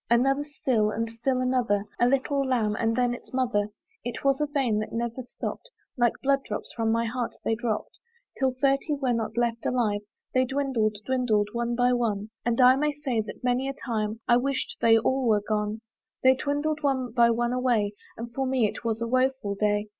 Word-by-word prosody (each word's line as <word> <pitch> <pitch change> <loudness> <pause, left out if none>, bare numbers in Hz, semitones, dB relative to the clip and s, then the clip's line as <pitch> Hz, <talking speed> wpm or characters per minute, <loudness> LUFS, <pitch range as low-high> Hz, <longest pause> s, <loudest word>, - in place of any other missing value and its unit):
Another 270 +4 +3
still! 255 -7 0
and 230 +2 -2
still 250 +3 -1
another! 245 -6 +1
A 240 - +5
little 275 +2 +1
lamb, 235 -6 +1
and 225 0 0
then 245 0 +2
its 245 - -10
mother! 235 -5 +1 0.3
It 240 0 -5
was 275 +1 +2
a 300 - +1
vein 265 -7 0
that 215 - -4
never 235 +2 -3
stopp'd, 255 - -6 0.3
Like 240 -2 +3
blood 275 0 +2
drops - - -5
from 225 -1 0
my 230 +1 +1
heart 240 +1 -3
they - - +2
dropp'd. 230 +8 -3 0.4
Till 265 -1 +2
thirty 275 +4 +2
were 265 -3 0
not 225 -1 -3
left 235 -1 0
alive 215 -5 0 0.3
They 255 - +4
dwindled, 260 -5 0
dwindled, 240 -6 +1
one 235 0 -1
by 245 +1 +3
one, 215 -3 -1
And 235 0 0
I 255 0 +7
may 300 +1 +1
say 270 -6 -1
that 215 - -9
many 250 +2 +1
a - - -3
time 220 -4 -3
I 240 - +6
wished 265 +1 -2
they 225 -1 +6
all 260 +3 +1
were 210 -2 +3
gone: 215 0 -1 0.4
They 260 0 +7
dwindled 290 +3 -1
one 265 -4 0
by 235 0 +4
one 240 +1 +1
away; 240 -5 +1 0.4
For 270 +1 -1
me 255 -4 +2
it - - -7
was 230 0 -1
a - - -2
woeful 255 -4 +1
day. 205 +1 0
240 Hz, 200 wpm, -27 LUFS, 225-265 Hz, 0.4 s, I